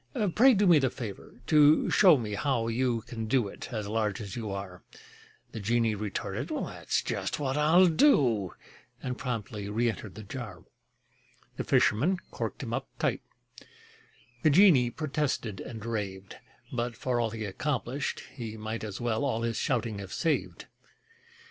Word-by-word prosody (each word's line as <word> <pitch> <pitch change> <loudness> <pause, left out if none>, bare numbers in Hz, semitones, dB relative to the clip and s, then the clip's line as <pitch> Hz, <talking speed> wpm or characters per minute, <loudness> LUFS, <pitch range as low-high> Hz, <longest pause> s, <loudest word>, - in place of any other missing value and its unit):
Pray 255 +2 +6
do 205 +1 +3
me 170 -5 +7
the 135 -2 +2
favor 115 0 -8
to 150 +1 +5
show 180 -7 +7
me 110 -4 -4
how 120 0 0
you 120 0 0
Can 115 0 -6
do 120 -2 +2
it, 100 - -9
as 110 -4 -3
large 105 -2 -1
as 100 -3 -6
you 115 -3 -4
are." 95 -2 -6 0.7
The 110 - -6
genie 115 +2 +1
retorted: 105 -1 -4
"That's - - -2
just - - -2
what 135 -2 -1
I'll 160 +5 +5
do!" 135 - +3 0.5
And 125 - -2
promptly 110 -5 -4
reëntered 110 -1 -2
the 110 - -8
jar. 105 -5 -7 0.9
The - - -2
fisherman 160 - +3
corked - - -4
him - - -4
up - - -2
tight: - - 0 1.2
The 155 - +4
genie 150 -7 +6
protested 140 - -2
and 110 -3 -8
raved, 100 -4 -4 0.4
But 120 -1 -2
for 125 -2 -1
all 115 -1 +1
he 110 0 -5
accomplished, 135 +5 -3
he 115 -4 -6
might 110 +1 -5
As 105 -3 -5
well 120 +1 -1
all 115 -5 -1
his 115 -1 -1
shouting 110 -4 -1
have 95 -2 -7
saved. 165 -3 -1
115 Hz, 155 wpm, -29 LUFS, 105-140 Hz, 1.2 s, me